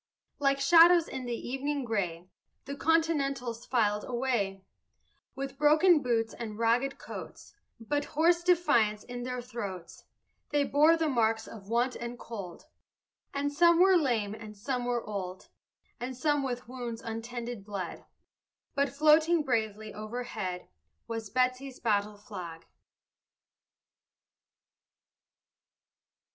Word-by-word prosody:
Like 275 -1 +2
shadows 335 +4 +7
in 260 -1 -6
the 235 -1 -4
evening 275 +1 -2
gray 180 -6 -2 0.4
The 280 +1 -5
Continentals 275 -7 0
filed 210 -4 +1
away, 235 -7 -1 0.7
With 275 0 -6
broken 310 +2 +5
boots 230 -3 0
and 215 -3 -6
ragged 235 +4 +1
coats, - - -9 0.3
But 290 +6 -1
hoarse 335 +3 +2
defiance 240 - +3
in 245 0 -7
their 250 0 -4
throats; 205 -8 -7 0.4
They 290 -1 +2
bore 300 +4 +4
the 325 -1 0
marks 225 -4 +1
of 205 -3 -11
want 240 +2 +1
and 235 +1 -6
cold, 200 -8 -8 0.7
And 285 +1 -2
some 340 +2 +5
were 380 +1 +6
lame 235 - +1
and 215 -1 -10
some 250 +3 -2
were 240 -1 -1
old, 190 -3 -6 0.5
And 250 +1 -5
some 290 +1 +1
with 250 -3 -4
wounds 240 -2 -6
untended 230 0 -5
bled, 195 -4 -6 0.7
But 280 -1 +1
floating 310 +4 +4
bravely 220 -5 -2
overhead 215 -4 -5 0.4
Was 225 -2 -5
Betsy's 255 +2 0
battle 210 -2 0
flag. 180 -6 -9
245 Hz, 120 wpm, -30 LUFS, 220-285 Hz, 0.7 s, shadows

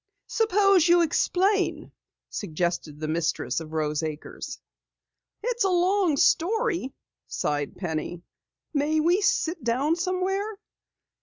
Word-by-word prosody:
"Suppose 395 -5 +3
you 345 0 +6
explain," 380 +4 +1 0.4
suggested 170 -4 -3
the 155 - -3
mistress 160 +1 -1
of 160 -1 -9
Rose 150 -2 -1
Acres. 155 -1 -6 0.9
"It's 480 -1 0
a 385 - +2
long 360 -3 +2
story," 365 - +2 0.4
sighed 145 -1 -2
Penny. 170 0 -4 0.5
"May 300 +2 +1
we 345 +6 +3
sit 370 - +1
down 265 +7 +1
somewhere?" 375 +4 -1
330 Hz, 105 wpm, -26 LUFS, -, 0.9 s, you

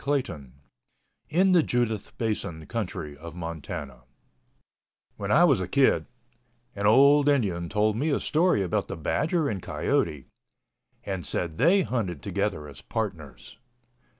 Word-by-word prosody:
CHAPTER 140 - -1
VII 70 -2 -15 0.8
IN 185 +4 +3
THE 180 -2 +6
JUDITH 120 -7 -2
BASIN 95 -8 -3
COUNTRY 90 -10 -4
OF 85 +1 -9
MONTANA 80 -6 -6 1.2
When - - -3
I - - +6
was - - +4
a - - -3
kid, - - +2 0.7
an 100 0 0
old 140 +5 +6
Indian 95 -12 0
told 105 0 +1
me 145 +8 0
a 140 - +1
story 160 - +2
about 90 - -1
the - - -6
badger 150 - 0
and 100 -8 -3
coyote 75 -6 -1 0.8
and 95 -3 -4
said 85 -3 -3
they 180 +8 +5
hunted 95 - -3
together 100 -5 -2
as 70 -1 -12
partners. 85 - -6
100 Hz, 140 wpm, -26 LUFS, 85-135 Hz, 1.2 s, THE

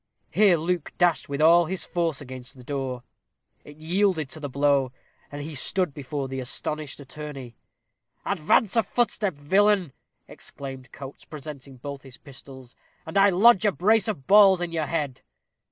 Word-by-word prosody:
Here 200 -5 +4
Luke 170 0 -3
dashed 175 -5 +1
with 140 +1 -3
all 170 +2 +6
his 190 +2 -2
force 165 -5 -2
against 130 0 -9
the 125 - -13
door. 130 -2 -4 0.6
It 145 0 -14
yielded 165 -1 0
to - - -5
the 145 -2 -5
blow, 140 -1 +1 0.4
and 145 0 -6
he 155 +2 -7
stood 175 +3 +1
before 140 0 -5
the 135 0 -5
astonished 150 +4 -2
attorney. 140 -3 -9 0.7
"Advance 200 +3 +1
a 230 - +5
footstep, 210 -6 -1
villain," 190 +2 +2 0.3
exclaimed 135 -3 -10
Coates, 135 0 -10
presenting 140 -3 -10
both 140 +2 -8
his 135 -2 -13
pistols, 130 -2 -13 0.3
"and 160 - -9
I 200 0 +6
lodge 205 +3 +5
a 210 - +3
brace 210 +4 +2
of 180 -12 -4
balls 195 -2 +6
in 175 -1 -3
your 160 -3 -2
head." 145 -6 -3
150 Hz, 160 wpm, -25 LUFS, 135-180 Hz, 0.7 s, all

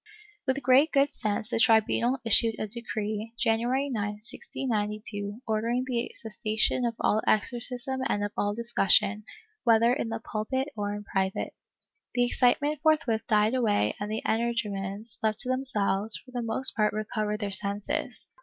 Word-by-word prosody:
With 265 +1 0
great 265 +5 +5
good 280 0 +3
sense 210 0 -2
the 230 - -1
tribunal 230 +3 +3
issued 225 0 +4
a - - -2
decree, 215 -1 -4
January 240 +5 +1
9, 240 -6 -2 0.2
1692, 210 -2 -4
ordering 230 +3 0
the 245 -2 -2
cessation 220 +2 0
of 230 -1 -1
all 215 - +2
exorcism 250 +4 +1
and 205 -5 0
of 205 - -2
all 205 0 0
discussion, 215 -2 +2 0.4
whether 230 0 +4
in 250 -4 -2
the 225 0 -3
pulpit 260 +6 -3
or 205 -1 -2
in 205 - -7
private. 190 -1 -2 0.6
The 245 -1 +3
excitement 275 +5 +2
forthwith 305 -8 +2
died 215 +1 +3
away 210 - +2
and 205 - -4
the 220 - -3
energumens, 215 -2 -2
left 215 -1 +2
to 255 - 0
themselves, 220 -5 +1
for 255 - -16
the 245 -1 -3
most 230 +3 +1
part 210 -1 +2
recovered 215 0 -2
their 205 -2 -3
senses. 200 +1 -2
225 Hz, 155 wpm, -28 LUFS, 210-245 Hz, 0.6 s, great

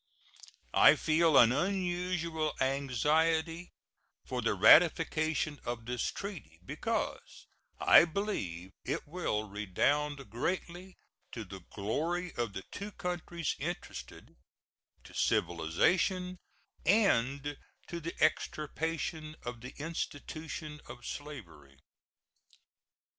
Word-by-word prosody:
I - - +8
feel 160 -1 +3
an 120 0 +8
unusual 175 -1 -1
anxiety 155 +6 +1 0.6
for - - -3
the - - +1
ratification 155 -1 +5
of 120 -1 -4
this 120 0 -2
treaty, 180 - -7
because - - -3 0.3
I - - +8
believe 100 - -3
it - - -2
will 145 -10 -2
redound 135 +8 0
greatly 180 +7 -3 0.4
to 115 - -4
the 95 0 -9
glory 160 - -2
of 120 -4 -2
the 95 -1 -5
two 205 +1 -6
countries 175 -3 -3
interested, 170 +5 -6 0.7
to - - -14
civilization, 180 - +1 0.4
and 145 - +2 0.3
to 170 - -5
the 170 +1 -5
extirpation 155 0 -1
of 120 -1 -5
the 125 +2 -9
institution 155 0 -5
of 120 - -10
slavery. 90 - -8
155 Hz, 95 wpm, -32 LUFS, 120-170 Hz, 0.7 s, I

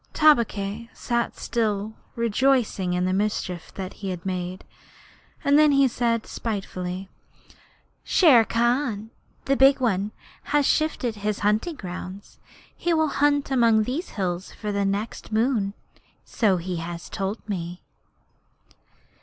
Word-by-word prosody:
Tabaqui 230 -7 +2
sat 235 -1 -2
still, 215 -2 -1 0.2
rejoicing 235 -5 +1
in 180 0 +1
the 185 - +1
mischief 190 -3 -2
that 190 -1 -5
he 195 - -3
had 180 -1 -5
made, 185 0 -4 0.8
and 285 +1 +5
then 305 -1 +6
he 275 -1 +5
said 230 -2 0
spitefully: 190 -4 -4 1.0
'Shere 280 - +6
Khan, 235 -1 0 0.3
the 275 - +2
Big 270 +1 +6
One, 205 -5 +1 0.4
has 290 -1 +2
shifted 260 -8 +1
his 210 0 -2
hunting 215 +11 +1
grounds. 185 -1 -8 0.4
He 345 -1 0
will 315 -1 +2
hunt 285 0 +1
among 230 -4 +4
these 275 - -3
hills 185 -2 -3
for 210 - -5
the 200 0 0
next 200 +4 -3
moon, 220 -3 +1 0.5
so 205 -5 +2
he 180 +1 -4
has 170 +1 -6
told 200 +3 -4
me.' 180 -3 -5
215 Hz, 130 wpm, -25 LUFS, 190-255 Hz, 1.0 s, then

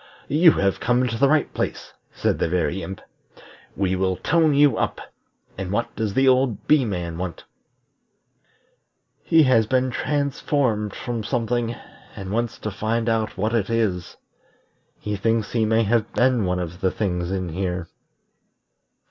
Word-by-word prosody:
"You 160 +2 +6
have 100 -1 0
come 125 +1 +2
to 115 - -3
the 135 +4 +3
right 155 0 +2
place," - - -4 0.2
said - - -1
the - - 0
Very 85 +1 0
Imp. 95 +3 -7 0.7
"We 95 -1 0
will 95 0 0
tone 160 -2 +2
you 145 -1 +5
up. - - -1 0.6
And 95 -2 -4
what 115 +3 -2
does 110 -3 -2
that 135 - +3
old 130 -3 +2
Bee 150 -4 +4
man 85 -5 -4
want?" 90 -2 -5 1.8
"He 160 -1 +4
has 115 -5 +3
been 130 +1 +1
transformed 140 -6 -1
from 120 -3 -4
something, 120 0 -1 0.4
and 95 -1 -7
wants 115 +1 -1
to 105 - -3
find 110 +3 -1
out 110 -2 -1
what 110 +4 -1
it 110 -3 0
is. 95 -7 -1 0.8
He 105 0 -4
thinks 115 +1 0
he 115 -2 +1
may 110 +1 +3
have 110 0 +1
been 125 -4 +2
one 90 0 0
of 90 +1 -5
the 95 - +3
things 90 -4 -2
in 95 -2 -2
here." 90 0 -3
110 Hz, 155 wpm, -23 LUFS, 95-125 Hz, 1.8 s, You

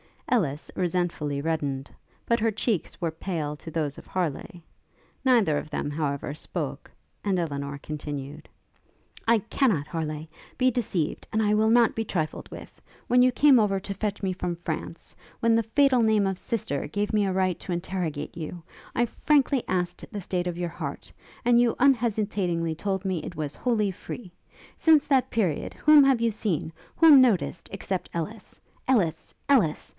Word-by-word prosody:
Ellis 155 - 0
resentfully 170 -5 -1
reddened; 145 -4 -2 0.3
but 235 - +2
her 225 +1 +2
cheeks 215 -4 -2
were 165 -2 0
pale 160 -3 -3
to 160 - -9
those 150 -3 -2
of - - -12
Harleigh. 175 -1 -3 0.6
Neither 225 - +4
of 155 - -5
them, 145 -1 -3
however, 145 -2 -2
spoke; 155 - -5 0.3
and 195 -2 +1
Elinor 140 -4 -3
continued. 145 -1 -6 0.8
'I 230 0 +5
cannot, 195 - +1
Harleigh, 155 -1 -4 0.3
be 255 0 +3
deceived, 195 -10 -2
and 220 0 +2
I 210 0 +2
will 215 +1 +3
not 235 0 +4
be 225 - -2
trifled 160 -6 -3
with. - - -11 0.3
When 250 +1 +5
you 255 0 +5
came 275 0 +6
over 200 -3 +2
to 200 +1 -4
fetch 205 +1 -3
me 190 - +1
from 180 -1 -3
France; 170 0 -6 0.3
when 230 0 +4
the 230 - +4
fatal 255 +2 +3
name 220 -2 +3
of 190 -1 -1
sister 165 -11 -2
gave 205 +7 -2
me 210 -1 +3
a 190 - 0
right 185 -2 +1
to 180 - -4
interrogate 170 -4 -3
you, 165 +1 -6 0.3
I 240 - +3
frankly 275 +1 +2
asked 180 -1 -2
the 205 -2 -5
state 180 -1 -2
of 175 -1 -3
your 175 -1 -2
heart, 170 - -6 0.3
and 240 -1 +5
you 240 -1 +3
unhesitatingly 210 -10 +1
told 190 +3 -2
me 185 -3 0
that - - -7
it 170 - -8
was 150 -2 -3
wholly 215 -5 0
free. 185 +1 -8 0.5
Since 315 -3 +5
that 270 -3 +2
period, 190 -10 -1
whom 300 -2 +6
have 265 -4 +3
you 230 -1 +2
seen, 200 -7 -1 0.2
whom 310 -5 +8
noticed, 210 -8 +1
except 190 -1 -3
Ellis! 170 +7 -6 0.3
Ellis! 180 -11 +1 0.2
Ellis! 210 - +2
190 Hz, 170 wpm, -26 LUFS, 160-230 Hz, 0.8 s, whom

